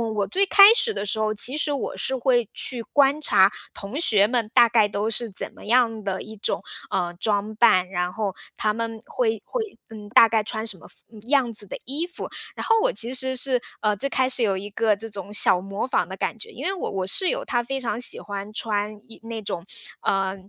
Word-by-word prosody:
我 200 -2 0
最 390 - +2
开 400 +2 +8
始 465 -1 +2
的 210 - -3
时 210 +2 -1
候， 215 0 +1
其 250 +6 +1
实 300 -1 0
我 280 - -4
是 265 - -1
会 245 -3 +1
去 245 -3 -2
观 280 +4 +2
察 195 -9 +4 0.2
同 205 +9 -6
学 210 -11 +4
们 235 -2 0
大 235 - +6
概 220 -2 +4
都 205 +1 -2
是 230 +1 +2
怎 190 - -7
么 - - -14
样 225 -1 +2
的 190 -1 -3
一 220 0 -10
种， 190 - -1 0.3
呃， 175 -2 -1
装 210 0 0
扮， 210 -5 +4
然 180 -1 -2
后 205 -2 -2 0.2
他 215 -1 0
们 225 0 -4
会 225 -4 -1
会， - - -3 0.3
嗯， 215 -2 -10
大 225 0 +7
概 220 -1 +2
穿 220 +1 -4
什 210 -4 -5
么 - - -15
风 220 - -17
样 265 -3 +2
子 205 -1 -4
的 - - -6
衣 295 +7 -1
服。 355 - -7 0.3
然 - - -4
后 455 -1 +4
我 - - +2
其 235 +2 -2
实 260 0 +1
是， 255 -1 +2 0.2
呃， 210 -1 +2
最 275 - 0
开 260 -1 +1
始 255 -2 +3
有 195 -3 +1
一 200 +2 -6
个 215 +1 +1
这 225 +3 -7
种 205 0 -5
小 185 -3 +3
模 195 +3 -4
仿 260 - 0
的 - - -7
感 - - -2
觉， 455 - -8
因 - - -9
为 385 - 0
我 380 - -4
我 190 -1 -2
室 365 - +3
友 - - -1
她 240 - 0
非 270 +3 -3
常 230 -3 -3
喜 250 - 0
欢 200 0 -6
穿 210 -1 -3
一 225 - -14
那 225 -1 -6
种， 175 -4 -5 0.4
呃， 195 0 0
225 Hz, 250 characters per minute, -24 LUFS, 205-255 Hz, 0.4 s, 开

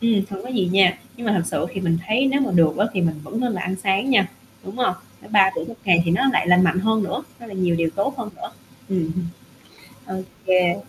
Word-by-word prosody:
Ừm, 230 -4 +2
hông 195 - -6
có 250 - -9
gì 220 -8 0
nha, 190 -2 +4 0.2
nhưng 240 -2 -7
mà 210 - +2
thực 170 - -1
sự - - -1
thì 190 - -4
mình 165 -2 +1
thấy 245 +6 +2
nếu 280 +1 +1
mà 265 - 0
được 160 -3 +4
á 205 +3 +2
thì 190 - -1
mình 165 -2 +1
vẫn 225 +8 -5
nên 245 -2 0
là 180 - -4
ăn 190 +1 -2
sáng 200 +7 +1
nha, 195 -7 +4 0.4
đúng 195 +5 -8
hông? 250 -8 +1 0.3
Nếu - - -16
3 195 -2 +5
bữa 165 - -2
1 230 - -9
ngày 175 -3 +5
thì 165 - 0
nó 190 +10 +2
lại - - +2
lành 180 +1 +5
mạnh 185 - +2
hơn 220 +1 +1
nữa, 190 - -3 0.2
nó 235 - -10
lại 200 -3 -9
nhiều 180 -2 +1
điều 165 -1 0
tốt 270 +8 0
hơn 240 -4 -5
nữa. - - -7 0.4
Ừm 175 -5 -1
hưm. 180 0 -3 0.9
Ô - - -4 0.2
kê. 180 -2 +3
190 Hz, 270 wpm, -22 LUFS, 180-220 Hz, 0.9 s, 3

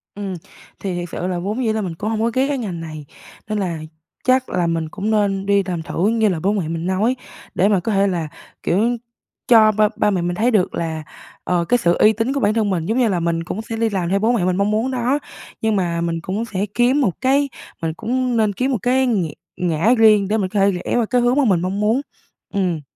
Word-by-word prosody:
Ừm, 200 -2 -4 0.5
thì 190 -3 -3
thiệt 175 - -5
sự 180 - -3
là 180 -1 -2
vốn 210 +8 -2
dĩ 220 - +1
là 220 - -1
mình 180 -5 -4
cũng 205 +6 -3
hông 220 -1 -1
có 230 +1 +1
ghét 260 +2 +2
cái 285 -1 -1
ngành 195 -9 -4
này, 155 -2 -8 0.4
nên 215 - -1
là 175 -5 -2 0.4
chắc 255 0 +2
là 180 -2 0
mình 165 -1 -1
cũng 210 +5 -3
nên 200 -2 +1
đi 200 0 +3
làm 175 -3 -3
thử, 175 +3 -1
như 220 -1 +2
là 175 -4 -1
bố 195 +6 +1
mẹ 190 -7 -1
mình 165 +1 -3
nói, 200 +7 +1 0.4
để 190 - +3
mà 200 -3 +3
có 200 +6 -2
thể 200 0 +3
là, 170 -5 -1 0.4
kiểu, 230 +7 +1 0.5
cho 220 -4 +7
ba 215 0 +3
ba - - +2
mẹ 185 - 0
mình 175 0 -1
thấy 230 +7 +2
được 205 -6 +1
là, 160 -2 -3 0.4
ờ, 175 -1 0
cái 245 - +3
sự 175 -7 +2
uy 215 - +5
tín 225 +5 -1
của 280 - -1
bản 205 -4 +2
thân 220 -2 +1
mình. 175 -4 -1
Giống 225 +7 0
như 250 -2 +3
là 190 -5 0
mình 165 0 -1
cũng 185 +5 -4
sẽ 225 0 -6
đi 225 0 +1
làm 185 -4 -2
theo 195 +2 +2
bố 220 +3 +2
mẹ 220 -7 +1
mình 185 0 +1
mong 200 +2 +1
muốn 225 +5 0
đó, 255 +3 0 0.4
nhưng 220 -1 +1
mà 170 -3 0
mình 165 -1 -2
cũng 195 +6 -3
sẽ 200 -3 -2
kiếm 250 +4 +3
một 195 -11 -1
cái 275 +2 +2 0.3
mình 165 -1 -1
cũng 245 +5 -1
nên 215 -2 +2
kiếm 255 +7 -1
một 255 - +1
cái 260 +3 +2
nghĩ 185 -11 0 0.2
ngã 175 +6 +2
riêng 215 -3 +5
để 215 +3 +1
mình 190 -3 -1
có 205 - -1
thể 195 +1 +4
rẽ 180 -2 -3
vào 235 - +2
cái 245 +3 +1
hướng 245 +1 +2
mà 285 - +4
mình 185 -7 +3
mong 185 +2 -2
muốn, 220 +5 +2 0.5
ừm. 180 -5 0
205 Hz, 260 wpm, -20 LUFS, 180-230 Hz, 0.5 s, cho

